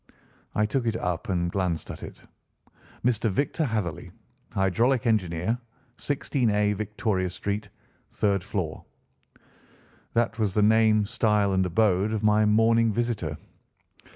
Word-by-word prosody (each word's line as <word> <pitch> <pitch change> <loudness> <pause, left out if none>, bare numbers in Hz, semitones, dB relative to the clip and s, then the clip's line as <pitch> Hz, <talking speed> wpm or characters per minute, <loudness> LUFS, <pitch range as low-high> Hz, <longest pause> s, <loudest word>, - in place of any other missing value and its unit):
I 105 - +3
took 120 +3 -1
it 115 - 0
up 90 -5 -3
and 85 -2 0
glanced 90 -4 -2
at - - -9
it. - - -10 0.8
"Mr. 115 -2 +2
Victor 140 - 0
Hatherley, 105 - -3 0.4
hydraulic 115 +7 +1
engineer, 105 0 0 0.4
16A, 110 -8 0
Victoria 105 -2 -1
Street 100 +3 -4 0.4
(3rd 100 -2 +1
floor)." 95 -4 -4 1.3
That 115 0 +1
was 105 -3 0
the 105 - +4
name, 110 -1 +4
style, 105 -2 +1
and 95 0 +2
abode 100 +2 +2
of 110 -1 -2
my 105 0 +4
morning 115 +1 +4
visitor. 105 -9 -2
105 Hz, 125 wpm, -26 LUFS, 95-115 Hz, 1.3 s, the